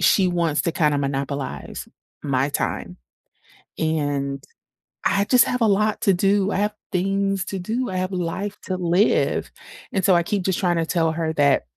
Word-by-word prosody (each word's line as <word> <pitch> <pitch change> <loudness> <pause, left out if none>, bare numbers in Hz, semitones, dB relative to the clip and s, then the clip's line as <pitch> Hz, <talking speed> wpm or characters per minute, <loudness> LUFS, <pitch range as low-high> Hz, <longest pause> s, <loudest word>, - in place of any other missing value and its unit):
she 190 -2 +4
wants 170 -4 0
to 170 - -1
kinda 150 -4 +2
monopolize 140 0 -4 0.4
my 140 -1 +1
time, - - -3 0.8
and 145 -3 -1 0.7
I 200 0 +3
just 250 +3 +5
have 250 - -1
a - - +5
lot 210 +1 +2
to 195 - +4
do. 195 +2 +2
I - - 0
have 210 +1 0 0.2
things 195 +1 0
to 195 - -4
do. 225 +8 -2
I 185 - -3
have 185 +1 -2
a - - -2
life 190 +4 -3
to 185 - -2
live, 180 +4 +2 0.4
and 190 -2 0
so 190 - +5
I 170 - +4
keep 195 +2 -1
just 190 -1 0
trying 175 -2 +1
to 165 - 0
tell 165 -1 +1
her 160 -1 -2
that 140 -2 +3
180 Hz, 185 wpm, -22 LUFS, 155-195 Hz, 0.8 s, just